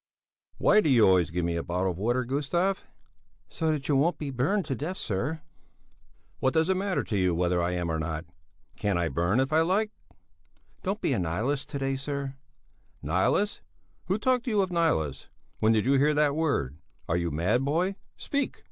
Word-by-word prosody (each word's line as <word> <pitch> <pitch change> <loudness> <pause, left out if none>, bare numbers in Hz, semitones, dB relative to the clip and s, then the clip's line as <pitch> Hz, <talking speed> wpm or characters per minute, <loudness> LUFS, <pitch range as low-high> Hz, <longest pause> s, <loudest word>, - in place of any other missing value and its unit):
"Why 215 - +5
do 155 - +1
you 120 -5 +6
always 90 -3 +4
give 85 +1 -2
me 85 0 -1
a - - -1
bottle 90 +2 -1
of 85 - -8
water, 120 +4 +1
Gustav?" 150 +9 -1 0.6
"So 160 -1 -1
that 150 -3 -1
you 145 - +2
won't 155 +4 +2
be 145 -2 -4
burned 150 +10 0
to 140 - -2
death, 160 +9 -4
sir." 140 +11 -2 1.0
"What 130 - +1
does 160 +2 +3
it 190 - +1
matter 195 -1 0
to 105 - -3
you 90 -3 +2
whether 90 0 +1
I 85 +1 0
am 85 -2 -1
or 80 - -1
not? 80 0 -3 0.5
Can't 100 -3 0
I 85 -1 0
burn 85 +9 +1
if 135 +3 0
I 160 - +5
like?" 200 +6 +1 0.9
"Don't - - -2
be - - +1
a - - 0
nihilist 110 - -1
to 145 - -4
day, 135 0 -1
sir." 140 0 -4 0.7
"Nihilist? 95 - +1 0.4
Who 190 - 0
talked 255 +2 +1
to - - -1
you 210 -3 +3
of 190 -1 -1
nihilists? 80 - 0 0.3
When 110 - +4
did 110 -1 +2
you 135 +1 +4
hear 150 +2 +3
that 145 -1 +3
word? 80 - -1 0.3
Are 85 - 0
you 85 -1 0
mad, 90 - +1
boy? 170 +8 0 0.2
Speak!" 280 -1 -2
135 Hz, 200 wpm, -28 LUFS, -, 1.0 s, you